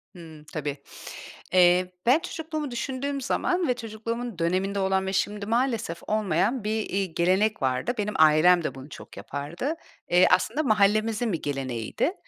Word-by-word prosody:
Hımm, 160 -3 -12
tabii. 145 -2 -3 0.8
Eee, 180 0 +4
ben 260 +7 +5
çocukluğumu 315 -4 -5
düşündüğüm 270 +3 -3
zaman 355 +6 0
ve 250 - +3
çocukluğumun 230 -2 -5
döneminde 190 +4 0
olan 190 0 +1
ve 190 - -3
şimdi 205 +1 -1
maalesef 230 -7 -1
olmayan 215 +3 0
bir, 215 +1 -1
iii, 190 -3 -2
gelenek 190 +3 +2
vardı. 130 - 0
Benim 210 0 -2
ailem 160 +3 +6
de 135 - -3
bunu 135 +2 -10
çok - - -12
yapardı. 170 - -4 0.3
Eee, 180 +1 +5
aslında 285 +8 +2
mahallemizin 215 -1 +2
bir 165 - -3
geleneğiydi. 135 - -2
200 Hz, 145 wpm, -26 LUFS, 170-240 Hz, 0.8 s, ailem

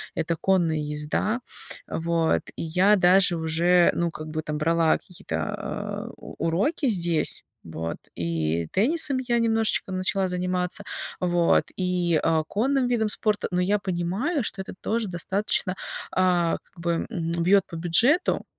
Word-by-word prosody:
это 165 +1 -1
конная 170 -2 +1
езда. 150 +10 -2 0.5
Вот, 165 0 0
и - - -6
я 180 +6 +4
даже 180 -1 +4
уже, 170 +2 +3
ну, 170 -1 0
как 155 -1 -8
бы 155 0 -3
там 150 0 -3
брала 165 +1 +2
какие-то, 170 - -8 0.7
э, - - -8
у - - -11
уроки 265 - 0
здесь, 175 -6 +3 0.2
вот, 80 0 -5 0.2
и 85 -1 -1
теннисом 280 - +2
я 240 -2 0
немножечко 225 -3 +1
начала 185 +1 0
заниматься, 180 +1 -1 0.4
вот, 175 -1 +2
и, 180 -3 +1
э, 160 -1 +2
конным 255 +6 +1
видом 225 -3 +1
спорта. 210 0 0
Но 180 0 +1
я 200 +3 +1
понимаю, 195 - -1
что 195 - -4
это 190 - -8
тоже 225 0 -1
достаточно, 190 +2 0 0.5
э, 180 -2 +2
как - - -29
бы, 170 0 -2
м, 170 -7 -3
бьёт 195 +2 +4
по 170 - -9
бюджету, 230 - +2
180 Hz, 145 wpm, -25 LUFS, 165-205 Hz, 0.7 s, я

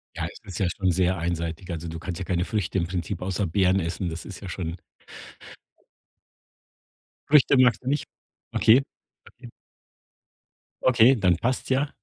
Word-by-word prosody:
Ja, - - -3
es - - -9
ist 95 -4 -7
ja 95 - +2
schon 95 -2 +1
sehr 90 +1 +1
einseitig. 85 +1 -3
Also, 85 0 -5
du 80 0 -6
kannst 85 0 -5
ja 95 - -4
keine 90 -1 0
Früchte 100 -3 -2
im 85 - -1
Prinzip 90 0 -4
außer 95 +2 -1
Beeren 95 +2 +2
essen, 85 +1 -3
das 80 +1 -6
ist 100 - -8
ja 95 - -8
schon 85 -1 -4 2.5
Früchte 140 -2 +5
magst 125 -3 +4
du - - -10
nicht? 145 +2 0 0.5
Okay, 120 +5 +5 0.5
okay. 120 -1 -14 1.3
Okay, 130 +1 +6
dann 90 -7 +2
passt's 125 +8 -2
ja. 135 +2 +1
95 Hz, 160 wpm, -25 LUFS, 85-110 Hz, 2.5 s, Okay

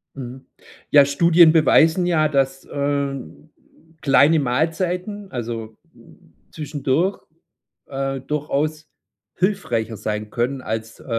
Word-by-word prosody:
Mhm. 130 0 -9 0.4
Ja, 145 -1 +7
Studien 170 +3 +5
beweisen, 165 +2 +4
ja, 155 -3 +2
dass, 135 -2 -1
äh, 140 -1 -1 0.9
kleine 145 +3 +4
Mahlzeiten, 180 - -2
also 115 -3 -5 0.7
zwischendurch, 155 +4 -1 0.7
äh, 135 0 -3
durchaus 150 +2 -2 0.5
hilfreicher 120 - -1
sein 105 +1 -4
können, 125 +4 -2
als, 110 -1 -5
äh, - - -16
140 Hz, 95 wpm, -21 LUFS, 130-160 Hz, 0.9 s, Ja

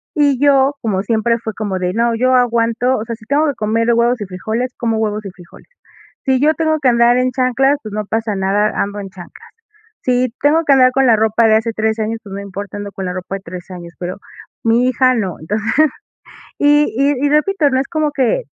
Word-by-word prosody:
Y 285 -3 +2
yo, 280 -1 +4
como 200 -4 -1
siempre, 230 +1 +1
fue 220 -2 -5
como 200 -4 -3
de 180 0 -2
no, 235 +1 +1
yo 255 +2 +2
aguanto, 240 +1 +1
o 215 - -5
sea, 230 0 -5
si 220 - -18
tengo 285 +6 +1
que 285 - 0
comer 225 +2 0
huevos 235 +1 +2
y - - -3
frijoles, 220 +7 -4
como 225 -2 -1
huevos 215 -1 -2
y 195 - -6
frijoles. 175 -2 -17 0.6
Si 265 -1 +2
yo 305 +2 +4
tengo 315 -1 0
que 265 - +3
andar 235 0 +4
en 255 0 +1
chanclas, 260 +2 +2
pues, 215 - -8
no 215 0 -2
pasa 220 -1 -2
nada, 200 +2 +1
ando 205 +1 -4
en 195 - -7
chanclas. 190 - -13 0.6
Si 250 0 +1
tengo 310 +3 +3
que 285 - +3
andar 255 -1 +5
con 270 -1 +2
la 230 - +6
ropa 220 +1 +2
de 220 - +4
hace 225 +1 -2
3 220 +1 -1
años, 225 +1 -2
pues, 195 -2 -10
no 200 - -5
importa, 200 +1 -7
ando 205 0 -6
con 195 - -6
la 180 - -2
ropa 185 +1 -5
de 195 - -7
3 180 +2 -9
años, 170 -1 -9
pero 180 +1 -5 0.5
mi 235 +2 +2
hija 255 +1 +3
no. 190 -7 -2
Entonces 210 +7 -4 0.9
y 295 -1 +3
y 280 0 +1
y 285 - +2
repito, 300 +1 +2
no 260 -1 +1
es 270 - -2
como 310 -3 -1
que, 275 - 0
230 Hz, 230 wpm, -17 LUFS, 205-260 Hz, 0.9 s, la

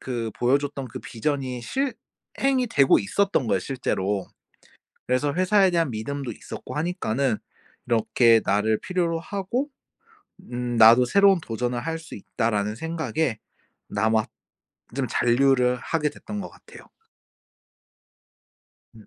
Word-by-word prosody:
그 120 -3 -3
보여줬던 135 +1 0
그 - - -7
vision이 130 0 -3
실행이 270 - -2
되고 140 - +4
있었던 195 - 0
거예요 95 - +2
실제로. 100 -4 -2 0.8
그래서 130 +3 +1
회사에 185 +3 +3
대한 165 -7 +1
믿음도 130 +3 -4
있었고 - - -9
하니까는 140 - -1 0.5
'이렇게 115 0 +4
나를 105 +2 +2
필요로 170 -3 -1
하고 200 - -3 0.8
음 120 0 -3
나도 115 +2 +7
새로운 200 +2 +5
도전을 120 -1 -3
할 165 +4 -3
수 165 - -11
있다.'라는 105 0 -2
생각에 160 -4 -2 0.5
남았 110 +1 +1 0.7
좀 135 -2 0
잔류를 125 +1 +3
하게 150 -2 0
됐던 210 +6 -7
것 - - -6
같아요. - - -16 2.1
음. - - -16
130 Hz, 275 characters per minute, -24 LUFS, 115-165 Hz, 2.1 s, 나도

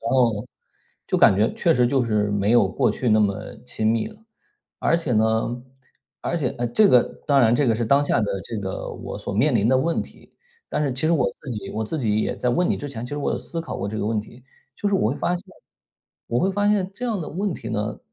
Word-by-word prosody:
然 115 - -3
后， 120 -3 +2 0.6
就 - - 0
感 - - +6
觉 105 +3 +2
确 165 - +2
实 125 -1 +3
就 130 +1 +2
是 105 -2 +1
没 100 0 +1
有 120 -5 +5
过 - - +1
去 125 - -2
那 110 0 +5
么 100 -2 +2 0.3
亲 110 - -2
密 115 - 0
了， 215 - -15 0.6
而 165 - +3
且 155 -7 -2
呢 110 +2 +1 0.6
而 - - -2
且 140 -7 0
呃， 120 - 0
这 200 - +4
个 125 -1 +6 0.2
当 140 -1 +4
然 115 -2 +4
这 140 +1 +2
个 115 - +3
是 115 +1 -1
当 140 +5 +4
下 145 - +1
的 100 -2 -2
这 115 - -5
个 95 -2 -4
我 - - -7
所 - - -5
面 130 +6 +2
临 110 -1 +3
的 130 - +4
问 165 +4 0
题， - - -17 0.4
但 - - 0
是 145 - 0
其 130 +5 -1
实 170 - +3
我 160 - +2 0.2
自 140 - -7
己 105 -4 -5
我 110 +1 -3
自 155 +8 -3
己 110 -4 +1
也 - - -1
在 125 - -1
问 175 +9 +1
你 - - +1
之 145 - -5
前， 115 -3 -6
其 125 - -8
实 145 - -3
我 145 - -1
有 - - -1
思 165 - -5
考 165 - -6
过 100 - -3
这 110 +1 -4
个 105 - -1
问 110 -1 0
题， 120 +3 -14 0.3
就 205 - -1
是 200 - +1
我 120 - +2
会 - - -2
发 175 +1 0
现 175 - -10 0.8
我 120 +1 +1
会 190 - +2
发 205 +1 0
现 195 -2 +1
这 250 - -6
样 215 -6 -1
的 155 - -5
问 195 +4 -2
题 115 - -7
呢 105 -2 -3
120 Hz, 285 characters per minute, -23 LUFS, 110-155 Hz, 0.8 s, 感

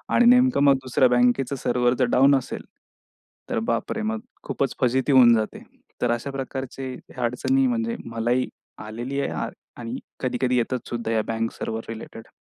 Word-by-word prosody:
आणि 240 - +5
नेमकं 250 - +5
मग 140 -1 +7
दुसऱ्या 130 0 +4
बँकेचं 125 +2 +2
सर्व्हर 125 -1 +1
जर - - +4
डाउन 135 +2 +5
असेल, 135 - -3 0.9
तर - - 0
बापरे! 170 - -2
मग 220 +1 -2 0.2
खूपच 135 - -2
फजिती 130 +2 +2
होऊन 125 -3 +7
जाते. 110 -1 -3 0.4
तर 120 - +2
अशा 120 +4 -2
प्रकारचे 135 -1 -5 0.2
अडचणी 125 - +1
म्हणजे 230 -1 -1
मलाही 115 +2 0 0.4
आलेली 120 +6 -4
आहे - - -3 0.3
आणि 120 +1 -5 0.2
कधी-कधी 125 0 0
येतात 125 +1 -1
सुद्धा 115 -1 -3
या 110 - +2
बँक 115 0 -1
सर्व्हर 110 0 -4
रिलेटेड. 115 0 -8
125 Hz, 155 wpm, -24 LUFS, 120-140 Hz, 0.9 s, मग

